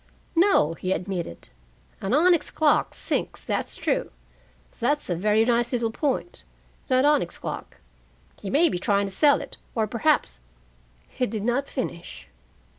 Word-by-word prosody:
"No," 335 - +4
he 185 +3 -2
admitted. 180 - -5 0.5
"An 195 - -2
onyx 335 +4 +4
clock 305 -2 +2
sinks, - - -2
that's - - -2
true. - - -1 0.7
That's 290 -3 0
a - - +1
very 210 +5 +2
nice 240 +1 +1
little 230 -2 0
point, 290 +7 -2 0.4
that 255 0 +3
onyx 290 - +2
clock. - - -6 0.6
He 195 - -5
may 310 - +4
be 180 - -2
trying 200 +1 +1
to 195 - -5
sell 285 +9 +4
it, - - -9 0.2
or 220 -2 +2
perhaps 240 - +1 0.4
" - - -34 0.3
He 250 - -2
did 210 -1 -4
not 245 +4 0
finish. 170 - -6
235 Hz, 150 wpm, -25 LUFS, 195-290 Hz, 0.7 s, No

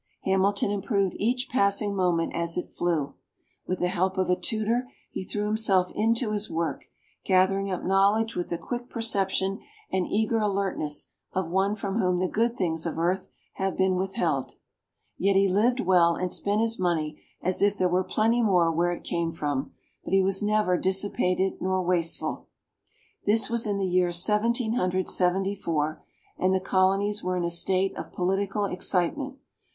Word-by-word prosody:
Hamilton 195 +1 +1
improved 200 -2 0
each 250 +4 0
passing 200 -4 +1
moment 175 -3 +1
as 170 0 -1
it 180 - -4
flew; 160 -5 -1 0.5
with 185 - -1
the 180 - 0
help 185 +2 0
of 185 -1 +1
a - - +4
tutor 230 +5 -1 0.2
he - - -4
threw 205 +2 -3
himself 210 -4 +2
into 230 +1 +1
his 210 0 -2
work, 165 0 -3 0.4
gathering 195 +1 +2
up 185 - -3
knowledge 200 +4 +2
with 175 - -3
the 170 - -2
quick 240 +8 -6
perception 195 -4 0 0.3
and 185 -1 0
eager 220 +2 +1
alertness 195 -8 -1 0.2
of 185 -3 -2
one 195 +3 +1
from 200 +1 -3
whom 180 -3 +2
the 185 +1 0
good 230 +5 0
things 165 -3 -1
of 165 - -4
earth 180 +3 0 0.3
have 190 -1 -1
been 190 0 +2
withheld. 195 +5 -1 0.7
Yet 195 0 +2
he 195 0 +4
lived 225 +7 +2
well 175 -2 +4
and 180 -1 -2
spent 205 +2 0
his 225 -1 -1
money 160 -4 -1 0.2
as 185 0 0
if 200 0 +3
there 185 - +2
were 180 +1 +1
plenty 225 +5 +1
more 180 -6 +3
where 175 +2 +1
it - - -8
came 170 -1 -2
from; 145 -3 -3 0.3
but - - -5
he 195 0 +5
was 195 +1 +2
never 210 -3 +2
dissipated 190 -1 0
nor 185 0 0
wasteful. 175 -2 0 0.8
This 220 +2 +3
was 235 -1 +1
in 205 -1 0
the 195 - 0
year 180 -1 +2
Seventeen 220 +6 +2
Hundred 185 -4 0
Seventy 190 +2 +1
four, 155 -5 -2 0.4
and 185 +1 +2
the - - +2
Colonies 195 +2 +1
were 185 0 -1
in 175 - -1
a 170 - -1
state 185 +3 +1
of - - -7
political 195 +3 -1
excitement. 195 - -1
190 Hz, 175 wpm, -26 LUFS, 180-210 Hz, 0.8 s, he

